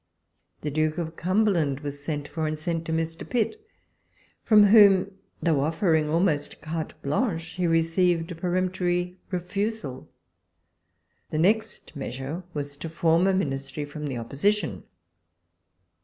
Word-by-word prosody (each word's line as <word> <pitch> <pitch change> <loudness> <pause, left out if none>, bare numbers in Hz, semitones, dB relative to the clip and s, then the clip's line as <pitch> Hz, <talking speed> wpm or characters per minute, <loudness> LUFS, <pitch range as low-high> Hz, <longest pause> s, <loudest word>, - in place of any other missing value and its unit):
The 150 - -3
Duke 155 +2 0
of 165 -1 -4
Cumberland 175 -7 +1
was 145 -1 -6
sent 145 -1 -3
for, 160 -1 -2
and 155 - -1
was 155 - -7
sent 165 -1 -2
to 165 - -4
Mr. 165 0 -2
Pitt, 255 - -1 0.8
from 215 -2 +6
whom, 200 -2 +6 0.3
though 160 -5 +3
offering 160 0 +1
almost 160 -3 0
carte 155 +1 -4
h}anrhi\ 165 - 0
he 180 -1 0
received 165 +1 +2
a - - -5
))eremptory 180 0 -1
refusal. 195 - -3 1.2
The 155 - -3
next 210 +1 0
measure 140 +4 -5
was 145 -2 -5
to 165 - -6
form 165 +2 +3
a 195 - +3
Ministry 135 -3 -2
from 150 +1 -6
the 130 -3 -3
Opposition. 160 - -1
165 Hz, 135 wpm, -26 LUFS, 150-185 Hz, 1.2 s, from